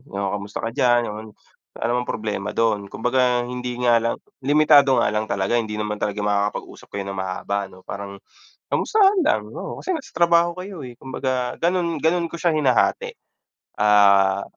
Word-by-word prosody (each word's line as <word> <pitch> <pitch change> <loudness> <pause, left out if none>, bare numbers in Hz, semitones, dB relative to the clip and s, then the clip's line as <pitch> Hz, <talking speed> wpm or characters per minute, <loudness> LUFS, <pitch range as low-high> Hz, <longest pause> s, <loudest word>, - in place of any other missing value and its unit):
"Oh 100 -1 -3
kamusta 100 +2 -5
ka 115 - -3
diyan," 120 -2 +3
ganun. 110 +1 -6 0.5
Wala 120 - -2
namang 125 0 0
problema 105 -1 -3
dun, 105 -3 +1
kumbaga 125 +3 +1
hindi 125 0 -5
nga 120 -1 +5
lang 115 +1 -1 0.2
limitado 145 -1 +5
nga - - +1
lang 105 +1 -1
talaga 100 +4 0
hindi 110 -2 -3
naman 105 0 -3
talaga 105 0 -2
makakapag-usap 105 0 -2
kayo 100 - -5
ng 100 - -6
mahaba 95 +2 -3
ano 95 -1 -16
parang, 100 0 -7 0.5
kamustahan 400 -3 +3
lang, 305 - +1
oo, - - -6
kasi 375 - -2
nasa 310 -5 -7
trabaho 170 0 +3
kayo, 185 -3 -7
eh, 125 -2 -10
kumbaga 130 -1 -3
ganun 170 -2 0
ganun 170 +1 +2
ko 170 - -11
siya 170 +1 +1
hinahati, 130 -5 +1 0.6
ah 100 -2 +4
120 Hz, 170 wpm, -22 LUFS, 105-145 Hz, 0.6 s, nga